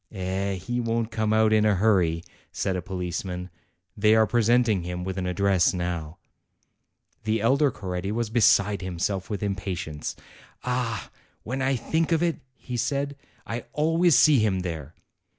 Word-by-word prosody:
"Eh, 95 0 -2
he 120 +7 -3
won't 115 -1 -1
come 110 -1 0
out 110 0 +4
in 110 -1 +4
a 105 -2 +3
hurry," 90 -5 +2 0.3
said 95 - -1
a 90 - -2
police 90 -1 -4
man; 90 -1 -6 0.4
"they 105 +1 +4
are 110 0 +5
presenting 115 -2 +3
him 90 +1 -5
with 95 0 -4
an 95 -1 -2
address 95 0 +2
now." 85 -2 -3 1.1
The 110 +1 0
elder 135 +7 +3
Coretti 95 -3 -4
was 115 0 -2
beside 105 -3 +4
himself 95 +1 -2
with 105 -1 -3
impatience. 95 -6 -3 0.5
"Ah! 125 -4 -2 0.3
when 130 +4 -3
I 135 +1 +2
think 160 +8 -1
of 165 0 +3
it," 170 -4 +1 0.2
he 125 -1 -6
said, 140 +3 -1 0.3
"I 115 +2 -5
always 165 +2 +3
see 150 -4 +6
him 100 -4 +1
there. 80 -4 -6
105 Hz, 160 wpm, -26 LUFS, 90-120 Hz, 1.1 s, see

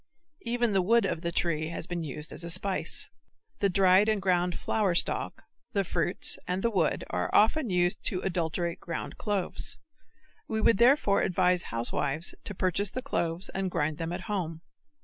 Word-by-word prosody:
Even 240 -2 0
the 195 - +3
wood 230 +4 +3
of 170 -4 -2
the 170 -1 -2
tree 160 -3 0
has 165 0 -4
been 175 -1 -4
used 150 +1 -5
as - - -8
a 170 - -5
spice. 185 +3 0 0.5
The 200 - +2
dried 190 +2 +5
and 215 -1 +2
ground 180 -2 +1
flower 200 -5 0
stalk, - - 0 0.3
the 200 - +2
fruits 175 -1 0
and 185 +1 -2
the 235 - +2
wood 175 -7 +1
are 90 0 -1
often 235 +5 +4
used 175 -1 +1
to 185 - +1
adulterate 170 -1 -2
ground 170 - -6
cloves. 205 -3 -2 0.7
We 220 - -1
would 215 -1 +3
therefore 240 -5 +4
advise 180 -1 +2
housewives 135 +7 -1
to 205 - -6
purchase 185 +2 0
the 255 - -5
cloves 170 -9 -1
and 190 0 -2
grind 155 -2 -1
them 165 0 -3
at 175 +1 -4
home. 175 -6 -3
180 Hz, 175 wpm, -29 LUFS, 170-205 Hz, 0.7 s, dried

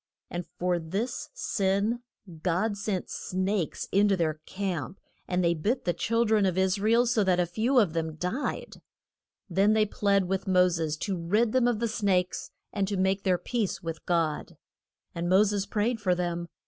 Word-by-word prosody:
And 175 0 -4
for 180 -1 +1
this 200 +10 -3
sin 200 +4 0 0.4
God 190 +5 0
sent 200 -2 -2
snakes 185 -1 -2
in 205 +1 +4
to 195 -1 +2
their 155 -2 -1
camp, 185 -3 -3 0.3
and 180 0 0
they 170 0 +3
bit 215 - -1
the 175 - +1
chil 230 +5 +1
dren 215 -2 +3
of 185 -1 -1
Is 190 +1 +2
ra 215 +2 +1
el 235 +1 +5
so 230 -3 +2
that 185 -2 +2
a 180 - +3
few 225 +10 0
of 200 -9 +4
them 160 -1 -2
died. 180 - -3 0.7
Then 195 +3 +3
they 215 -1 +4
plead 200 -2 +1
with 190 +1 -2
Mo 180 -1 +5
ses 160 -3 -2
to 195 - -1
rid 205 +7 +1
them 255 -1 +3
of 240 -3 +1
the 235 +2 0
snakes, 195 -5 0 0.2
and 200 0 -1
make 190 +1 +1
their 185 -2 +2
peace 210 +2 -2
with 165 -1 -5
God. 165 -3 0 0.6
And 170 +1 -2
Mo 190 +3 +6
ses 200 -1 -1
prayed 225 +2 0
for 185 -3 +2
them. 175 -1 -2
190 Hz, 185 wpm, -28 LUFS, 175-215 Hz, 0.7 s, Mo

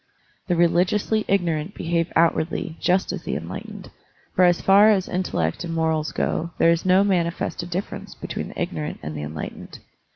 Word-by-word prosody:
The 180 - +1
reli 170 +1 +4
giously 210 +3 0
ignorant 175 -2 0
behave 165 0 -1
outwardly 165 0 +1
just 185 +1 +1
as - - -5
the - - -3
enlightened, - - -7 0.4
for 185 - +5
as 175 -1 +4
far 200 +2 +6
as 195 -4 +2
intellect 85 - -1
and 165 -1 -4
morals 160 -1 0
go 170 - -1
there 165 - +5
is 170 0 +1
no 185 +2 +5
manifested 175 -2 -1
difference 185 +3 -5
between - - -5
the - - -9
ignorant 80 -3 -3
and 75 +1 -5
the 75 - -4
enlightened. 75 +1 -7
170 Hz, 170 wpm, -23 LUFS, 160-185 Hz, 0.4 s, far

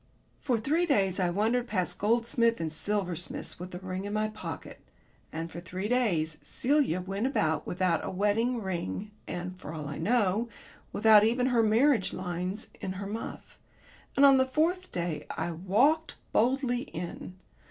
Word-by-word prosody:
For 250 -4 +1
three 320 +9 +1
days 195 - +2
I 180 -2 +2
wandered 225 +7 +1
past 180 -5 -1
gold 230 +3 +2
and 230 -9 +2
silversmiths 180 0 -2
with 180 +1 -6
the 180 - -7
ring 185 +1 -5
in 205 - -4
my 215 0 0
pocket... 215 - -7 0.5
and 165 +1 -5
for 170 - -6
three 185 +3 -4
days 180 -11 +1
Celia 265 - +1
went 195 +6 -2
about 160 - 0
without 180 -2 +1
a - - -3
wedding 215 +6 +1
ring, 190 - -3 0.2
and, 180 +1 -4
for 160 - -7
all 150 -2 -5
I 145 - -5
know, 215 +3 +1 0.4
without 215 -1 +6
even 240 +3 +2
her 245 -3 +3
marriage 225 0 +3
lines 185 +3 -4
in 185 - -3
her 195 +1 -6
muff. 215 +3 -7 0.6
And 280 - +6
on 275 -1 +8
the 260 - +3
fourth 340 +7 0
day 170 -4 -3
I 175 - -3
walked 230 - +2 0.2
boldly 245 +1 +2
in. 175 -2 -7
205 Hz, 165 wpm, -29 LUFS, 180-240 Hz, 0.6 s, on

